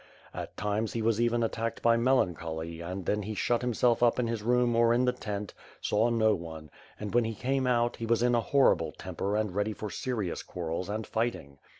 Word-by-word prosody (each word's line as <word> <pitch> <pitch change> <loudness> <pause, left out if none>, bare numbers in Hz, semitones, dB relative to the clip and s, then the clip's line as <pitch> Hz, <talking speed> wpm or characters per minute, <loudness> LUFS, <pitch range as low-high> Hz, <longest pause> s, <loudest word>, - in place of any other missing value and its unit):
At - - -7
times 105 +1 -1
he 115 - -2
was 115 0 +2
even 120 0 +2
attacked 115 0 -2
by 115 0 +5
melancholy 85 -9 0
and 90 +2 -5
then 105 +1 0
he 105 +2 -5
shut 120 +3 +1
himself 120 -1 +2
up 120 -1 +4
in 125 - +1
his 115 -2 -2
room 120 +1 +2
or 115 0 +4
in 125 +1 +3
the 125 - +3
tent, 105 -3 -5 0.3
saw 110 +3 +2
no 110 -2 +3
one; 80 -4 -7 0.3
and, 105 -1 -5
when 120 0 +4
he 110 0 -3
came 130 +4 0
out, 120 -1 +1
he 115 - -4
was 115 +1 +2
in 120 0 +3
a 120 - +3
horrible 140 +3 +3
temper 100 +1 -3
and 105 -3 0
ready 105 +2 0
for 105 -1 -6
serious 110 -9 -3
quar 85 -2 -6
rels 85 +4 -3
and 110 +1 -3
fighting. 110 -12 -3
110 Hz, 220 wpm, -29 LUFS, 100-120 Hz, 0.3 s, by